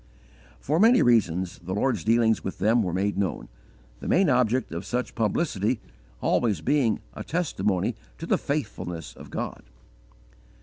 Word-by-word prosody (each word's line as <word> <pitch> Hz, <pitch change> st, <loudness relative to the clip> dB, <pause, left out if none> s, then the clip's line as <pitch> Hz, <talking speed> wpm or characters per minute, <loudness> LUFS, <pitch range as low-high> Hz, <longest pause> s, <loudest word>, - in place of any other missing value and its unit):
For 150 Hz, -, 0 dB
many 230 Hz, +5 st, +6 dB
reasons 95 Hz, -6 st, +2 dB
the 95 Hz, +2 st, -5 dB
Lord's 130 Hz, +5 st, 0 dB
dealings 115 Hz, 0 st, +3 dB
with 95 Hz, -, -4 dB
them 115 Hz, +3 st, +3 dB
were 90 Hz, -4 st, -1 dB
made 100 Hz, +3 st, -1 dB
known, 95 Hz, -4 st, -2 dB, 0.5 s
the -, -, -7 dB
main 185 Hz, -5 st, +4 dB
object 125 Hz, 0 st, +2 dB
of 85 Hz, +3 st, -4 dB
such 125 Hz, +5 st, -3 dB
publicity 110 Hz, -, 0 dB, 0.4 s
always 105 Hz, -8 st, +1 dB
being 125 Hz, -, +2 dB
a -, -, -6 dB
_testimony 105 Hz, -, 0 dB, 0.2 s
to -, -, -6 dB
the -, -, +1 dB
faithfulness 90 Hz, -, -4 dB
of -, -, -12 dB
God. -, -, -4 dB
110 Hz, 145 wpm, -26 LUFS, 95-130 Hz, 0.5 s, many